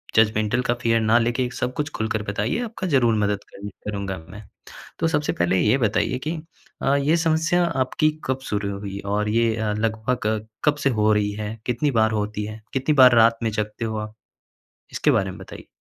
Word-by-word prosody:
Judgemental 110 +2 +3
का 120 - +3
fear 115 -1 +2
ना 110 +1 +4
लेके, 120 +2 0
सब 125 - -2
कुछ 150 +2 -2
खुलकर 110 -1 -2
बताइए, 105 - -1
आपका 215 -5 -5
ज़रूर 120 -7 +3
मदद 105 -1 0
करूँ 100 +1 -7 0.2
करूँगा 100 -2 -3
मैं। 105 +4 -10 0.6
तो 165 - +1
सबसे 150 -2 0
पहले 85 +2 +1
ये 115 +8 +3
बताइए 120 +2 +1
कि 165 +2 -1 0.5
अ, 135 - +3
ये 145 +4 +2
समस्या 165 +1 +2
आपकी 155 0 +1
कब 130 0 -1
शुरू 100 -1 -1
हुई 100 -1 -6 0.2
और 105 0 0
ये 115 +1 +2
अ, 110 -1 -1
लगभग 110 0 -1 0.2
कब 150 -1 +3
से 135 - +4
हो 105 0 +4
रही 105 -1 +1
है? 105 +1 -5
कितनी 130 +4 +1
बार 110 -3 +3
होती 105 0 -3
है? 110 +1 -7
कितनी 135 +3 +1
बार 125 -1 +8
रात 115 0 +5
में 115 - +1
जागते 105 +1 -3
हो 110 -1 -3
आप? 105 0 -6 0.8
इसके - - +2
बारे 95 -1 +1
में 95 - -11
बताइए। 95 - -11
110 Hz, 195 wpm, -23 LUFS, 105-130 Hz, 0.8 s, बार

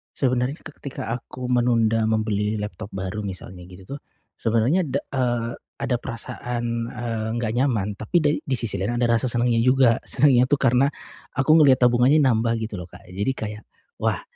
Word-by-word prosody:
Sebenernya 125 0 +1
ke - - -9
ketika 140 -4 -6
aku 125 +1 -5
menunda 115 -3 +2
membeli 110 -1 0
laptop 105 +1 -6
baru 95 +2 -4
misalnya 95 -2 -7
gitu 95 +9 -9
tuh, - - -19 0.4
sebenernya 115 +11 +2
da 140 -1 -2
eee, 120 -3 -1 0.3
ada 125 - 0
perasaan, 115 0 -4
eee, 115 -2 -4
nggak 110 -2 -1
nyaman. 120 -7 +1
Tapi 110 - -7
da 150 - +3
di 135 - -4
sisi 115 -3 -1
lain 100 +6 -1
ada 120 0 +1
rasa 115 +2 +2
senengnya 120 -1 +1
juga. 125 0 +4
Senengnya 130 -4 +4
tuh 140 +2 0
karena 125 0 +4 0.5
aku 155 +4 +4
ngeliat 135 -5 +5
tabungannya 125 +5 +5
nambah 115 -4 +2
gitu 110 -2 -4
loh 90 - -6
Kak, 90 - -16
jadi 100 +8 -1
kayak, 105 -3 -6 0.3
"Wah - - 0
120 Hz, 170 wpm, -23 LUFS, 110-130 Hz, 0.5 s, ngeliat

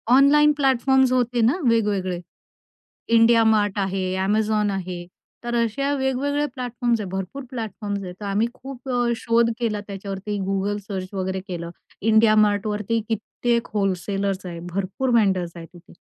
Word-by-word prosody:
Online 295 +2 +6
platforms 265 -1 +3
होते 245 -1 +1
ना 230 +4 +4 0.2
वेगवेगळे. 200 -6 +1 1.0
इंडिया 230 0 +6
मार्ट 210 -2 +2
आहे, 195 -1 -1 0.2
Amazon 210 0 +1
आहे. 180 -2 -4 0.4
तर 240 0 -2
असे 240 +5 0
वेगवेगळे 275 +2 0
प्लॅटफॉर्म्स 245 -2 -1
आहेत, 195 - -5
भरपूर 195 +9 -5
प्लॅटफॉर्म्स 210 -4 -4
आहेत. 180 -1 -7
तर 210 - -6
आम्ही 200 +3 +1
खूप 265 0 -10
अ, 245 -1 +1
शोध 230 0 +2
केला 215 -4 -1
त्याच्यावरती, 200 +1 -5
Google 195 +1 0
सर्च 190 -1 -5
वगैरे 190 0 -2
केलं. 170 -3 -5 0.3
इंडिया 220 0 +5
मार्टवरती 210 +2 -1
कित्येक 235 +2 -1
व्होलसेलर्स 195 0 -1
आहेत. 170 -2 -6
भरपूर 195 +7 -2
वेन्डर 195 -5 +3
आहेत 165 -1 -9
तिथे. 175 0 -16
215 Hz, 140 wpm, -23 LUFS, 195-240 Hz, 1.0 s, Online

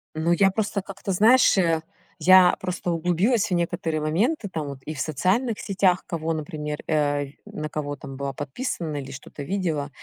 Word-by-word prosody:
Ну, 160 +2 0
я 195 +2 +4
просто 200 -1 -1
как-то, 195 0 -6
знаешь, 220 +4 +5
э 165 -3 +2 0.4
я 185 0 +7
просто 180 -1 -3
углубилась 180 +6 +1
в - - -1
некоторые 170 -2 -1
моменты 200 - 0
там 155 -5 -4
вот: 140 -1 -7
и 155 - -5
в 145 - -8
социальных 195 - 0
сетях, 190 -2 +1
кого, 165 -2 -2
например, 150 -1 -4
э, 145 -2 +1 0.2
на 155 0 -6
кого 145 -1 -4
там 135 -3 -9
была 140 -1 -3
подписана 155 - -4
или 135 -1 -6
что-то 140 +1 -9
видела. 160 -4 -2
165 Hz, 175 wpm, -24 LUFS, 150-195 Hz, 0.4 s, я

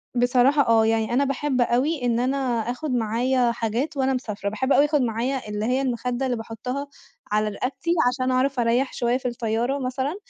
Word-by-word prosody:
بصراحة 250 +3 +3
آه، 225 -1 +4
يعني 225 +1 +1
أنا 275 +3 +3
باحب 275 -1 -1
أوي 255 +3 +1
إن 235 -1 +1
أنا 260 +3 0 0.3
آخُد 285 +3 -4
معايا 240 +2 +1
حاجات 235 +6 -2
وأنا 265 0 +1
مسافرة، 210 -5 -3
باحب 260 +6 0
أوي 285 - +5
آخُد 295 -2 +1
معايا 245 +1 -2
اللي 210 +1 -2
هي 255 +3 +1
المخدة 250 0 -2
اللي 245 -2 -1
باحطها 250 +5 -5 0.4
على 215 0 +1
رقبتي 265 +9 -3 0.2
عشان 255 +1 0
أعرف 260 0 +1
أريّح 240 +3 +1
شوية 240 +1 0
في 255 - -4
الطيارة 240 +3 -1
مثلًا، 260 +5 -2
250 Hz, 180 wpm, -24 LUFS, 230-270 Hz, 0.4 s, أوي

